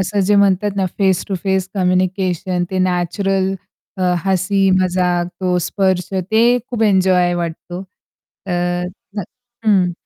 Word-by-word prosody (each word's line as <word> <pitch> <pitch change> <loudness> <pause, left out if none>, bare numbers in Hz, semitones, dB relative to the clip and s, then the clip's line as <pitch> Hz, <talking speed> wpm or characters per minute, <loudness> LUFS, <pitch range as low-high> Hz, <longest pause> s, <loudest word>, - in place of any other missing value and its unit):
असं 195 +2 0
जे 200 +2 +2
म्हणतात 200 0 +2
ना, 190 -1 +1
फेस 190 -3 +2
टु 195 - -1
फेस 190 -1 0
कम्युनिकेशन 185 -1 0
ते 190 - -1
नॅचरल 190 +2 0 0.4
अ, 185 - -3 0.2
हसी 195 +1 +2
मजाक 180 -1 +1
तो 180 -1 +1
स्पर्श 185 +1 0 0.2
ते 235 +3 +4
खूप 235 -2 -1
एन्जॉय 185 -3 +3
वाटतो. 175 +1 -5 0.6
तर 175 -1 -1 0.3
अ, - - +1 0.5
हं. 185 -4 +3
185 Hz, 130 wpm, -18 LUFS, 180-195 Hz, 0.6 s, ते